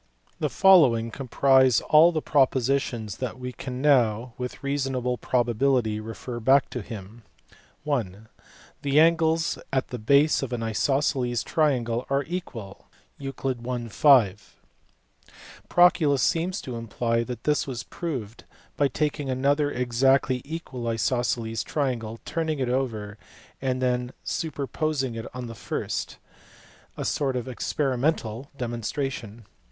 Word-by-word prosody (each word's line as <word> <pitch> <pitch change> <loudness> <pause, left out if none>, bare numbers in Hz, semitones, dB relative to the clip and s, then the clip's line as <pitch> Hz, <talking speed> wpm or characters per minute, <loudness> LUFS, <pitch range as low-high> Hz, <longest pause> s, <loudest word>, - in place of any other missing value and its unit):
The - - 0
following 135 - +5
comprise 130 0 +3
all 160 +3 +6
the 155 -2 -2
propositions 130 -5 +1
that 130 -2 -4
we 125 0 -5
can 125 +1 -6
now 120 -4 +3
with 125 +1 -6
reasonable 135 -3 -1
probability 120 -2 +1
refer 115 +2 -6
back 135 +4 +3
to 125 - -4
him. 105 +2 -9 0.7
(i) 140 -5 +2 0.8
The 140 +1 +3
angles 165 0 +3
at 130 -1 0
the 125 - -5
base 140 +7 +4
of 130 -2 -4
an 115 -2 -2
isosceles 125 +1 0
triangle 125 -6 0
are 140 +1 +1
equal 125 - -7 0.3
(Euc. 130 -3 -3
I. - - -9
5). 110 -6 +3 1.1
Proclus 160 -6 +4
seems 175 +3 0
to 125 -3 -6
imply 115 +1 -1
that 120 -1 -7
this 150 -1 +1
was 125 -3 -4
proved 125 -10 -6 0.3
by 145 - +3
taking 145 +1 -2
another 140 +3 +1
exactly 130 +1 +2
equal 140 -6 -6
isosceles 115 0 -1
triangle, 120 -6 -2
turning 160 -1 -2
it 130 -2 -1
over, 110 -5 -2 0.4
and 130 -1 -1
then 125 0 0
superposing 145 -3 -2
it 115 0 -5
on 125 -1 -5
the 115 - -7
first; 110 - -4 0.8
a - - -3
sort 135 -3 0
of 125 -1 -3
experimental 130 -1 -1
demonstration. 120 -2 -4
130 Hz, 125 wpm, -25 LUFS, 115-140 Hz, 1.1 s, all